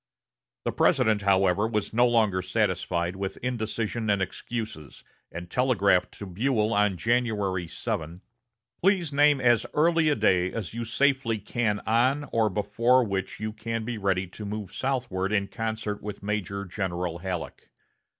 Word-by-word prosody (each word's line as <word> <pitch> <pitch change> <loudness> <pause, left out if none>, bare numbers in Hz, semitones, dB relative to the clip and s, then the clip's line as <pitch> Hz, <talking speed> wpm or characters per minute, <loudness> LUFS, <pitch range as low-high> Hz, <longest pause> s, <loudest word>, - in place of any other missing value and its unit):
The - - +1
President, 110 -2 +3
however, 100 +1 +3
was 105 -5 -2
no 120 +2 +4
longer 110 -6 +2
satisfied 90 -1 -1
with 95 0 -4
indecision 115 -2 -2
and 100 -1 +3
excuses, 100 - -5 0.3
and 85 +1 -7
telegraphed 100 -5 +2
to 100 - -8
Buell 110 +3 0
on 105 -1 +2
January 105 -6 0
7: 80 +2 -4 0.6
"Please 180 -5 +2
name 145 0 +5
as 120 -3 +3
early 165 +1 +3
a 150 - +3
day 95 -4 +2
as 110 -5 -5
you 115 0 -4
safely 130 -1 +1
can 105 0 -1
on 130 +6 +1
or 115 -2 +2
before 110 +6 +2
which 100 -4 -3
you 110 0 -3
can 115 +1 -4
be 120 -2 -4
ready 95 -2 +1
to 95 +4 -10
move 105 -1 -5
southward 120 -8 -2
in 100 -2 +1
concert 110 -2 -4
with 105 -1 -7
Major 100 -1 -3
General 90 -3 -3
Halleck. 90 -1 -5
105 Hz, 150 wpm, -27 LUFS, 95-120 Hz, 0.6 s, name